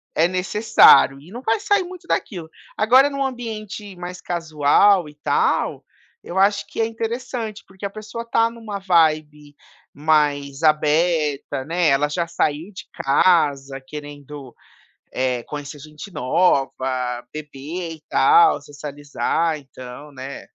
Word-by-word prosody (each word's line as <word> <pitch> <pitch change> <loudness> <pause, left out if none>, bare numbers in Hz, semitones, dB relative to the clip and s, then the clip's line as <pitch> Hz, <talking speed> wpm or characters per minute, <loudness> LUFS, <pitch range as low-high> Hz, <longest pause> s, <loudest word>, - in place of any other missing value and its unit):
é 165 +2 +3
necessário, 185 -6 +5
e 160 +6 -16
não 245 +3 -8
vai 225 -2 +1
sair 405 -1 +2
muito 355 0 -11
daquilo. 170 -6 -3 0.3
Agora 255 +6 +5
num 275 -1 -2
ambiente 215 -6 -6
mais 180 0 -7
casual, 170 +2 +2
e 150 - -14
tal, 150 - 0 0.4
eu 180 - -5
acho 200 +1 +2
que 215 - -6
é 225 - +3
interessante, 230 -1 -5
porque 190 +1 -8
a - - -5
pessoa 215 +2 -7
tá 230 0 +2
numa 225 -3 -7
vibe 155 -5 +1 0.4
mais 145 -1 +1
aberta 155 -3 +1
né, 170 +1 +1
ela 145 +1 +2
já 170 +3 -2
saiu 165 +2 -2
de 185 - -10
casa 140 -2 +2
querendo, 145 -2 -9 0.6
eh, 125 -2 -1
conhecer 145 0 -7
gente 150 +6 -11
nova, 135 +1 +2 0.6
beber 155 +3 -6
e - - -23
tal, 425 - +5
socializar, 145 +2 -3
então, 135 +1 -11
né. 135 +1 -8
165 Hz, 130 wpm, -21 LUFS, 145-205 Hz, 0.6 s, necessário